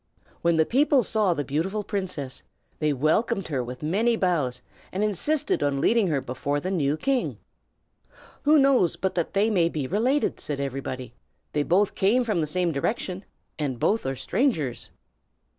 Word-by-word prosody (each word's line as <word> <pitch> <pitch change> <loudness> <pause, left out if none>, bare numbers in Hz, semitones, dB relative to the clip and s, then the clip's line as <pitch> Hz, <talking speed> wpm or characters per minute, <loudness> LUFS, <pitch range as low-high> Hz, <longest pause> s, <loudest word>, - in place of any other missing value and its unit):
When 170 0 +3
the 160 - +4
people 275 - +3
saw 210 -5 +1
the 145 - -1
beautiful 175 +10 -2
princess, 185 -11 -4 0.4
they 150 -1 +1
welcomed 160 - +1
her 135 -5 -1
with 125 +3 -8
many 215 +9 +2
bows, 155 - 0 0.3
and 195 +3 -1
insisted 215 - 0
on 140 -1 +1
leading 225 +6 +3
her 150 -5 +1
before 140 +3 -2
the 185 +6 -3
new 150 -5 +1
king. 270 +5 0 1.0
"Who 300 +2 +5
knows 270 - +4
but 190 0 -2
that 170 +1 -2
they 210 +3 +3
may 170 -5 +3
be 150 -5 -3
related?" 240 - +1
said 145 -2 -3
everybody. 130 -3 -4 0.4
"They 150 - +1
both 190 +7 +2
came 225 +6 +3
from 215 -7 0
the 155 - 0
same 175 +2 0
direction, 185 - -2 0.3
and 135 -5 -2
both 215 - +1
are 135 - -1
strangers." 155 - -1
175 Hz, 165 wpm, -25 LUFS, 145-215 Hz, 1.0 s, Who